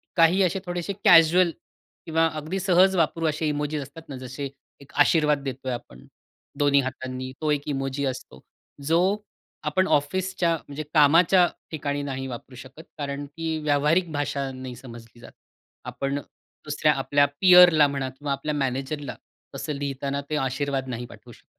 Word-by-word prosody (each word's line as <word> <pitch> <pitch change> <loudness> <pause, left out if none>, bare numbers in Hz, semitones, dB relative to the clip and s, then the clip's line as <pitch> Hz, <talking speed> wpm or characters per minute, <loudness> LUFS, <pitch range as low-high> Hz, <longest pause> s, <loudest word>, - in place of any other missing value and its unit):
काही 170 +3 +4
असे 185 +1 0
थोडेसे 175 +2 -3
कॅज्युअल 175 -2 +6 0.5
किंवा 165 0 +2
अगदी 155 +5 -4
सहज 190 +1 +4
वापरू 165 -1 +1
असे 155 +1 -2
इमोजीस 150 0 -2
असतात 145 +4 -11
ना 140 - -6
जसे 130 +2 -6 0.3
एक 140 - -17
आशीर्वाद 150 -3 +2
देतोय 130 -1 -4
आपण. 65 - -9 0.5
दोन्ही 145 -1 +4
हातांनी 130 0 -5
तो 155 -1 +1
एक 145 -1 +1
इमोजी 135 -1 -2
असतो. 130 - -6 0.5
जो 165 +2 +3 0.7
आपण 185 0 +1
ऑफिसच्या 180 +3 +1
म्हणजे 145 0 -8
कामाच्या 170 +4 +5 0.2
ठिकाणी 145 -2 -3
नाही 135 -1 -4
वापरू 125 +1 -9
शकत 130 +5 -12
कारण 145 -1 -4
की 160 +2 -4
व्यावहारिक 150 +4 +2
भाषा 145 -2 -2
नाही 130 -1 -8
समजली 120 -2 -13
जात. - - -13 0.5
आपण 140 +1 -3 0.5
दुसऱ्या 150 0 +2
आपल्या 145 +1 +2 0.2
पीअरला 180 -5 +8
म्हणा 135 -2 -3
किंवा 140 +2 -6
आपल्या 140 +2 -2
मॅनेजरला, 135 +1 -3 0.4
तसं 150 - -4
लिहिताना 140 0 -3
ते 155 - -1
आशीर्वाद 135 -1 -2
नाही 120 0 -4
पाठवू - - -14
शकत. - - -17
145 Hz, 150 wpm, -25 LUFS, 135-160 Hz, 0.7 s, पीअरला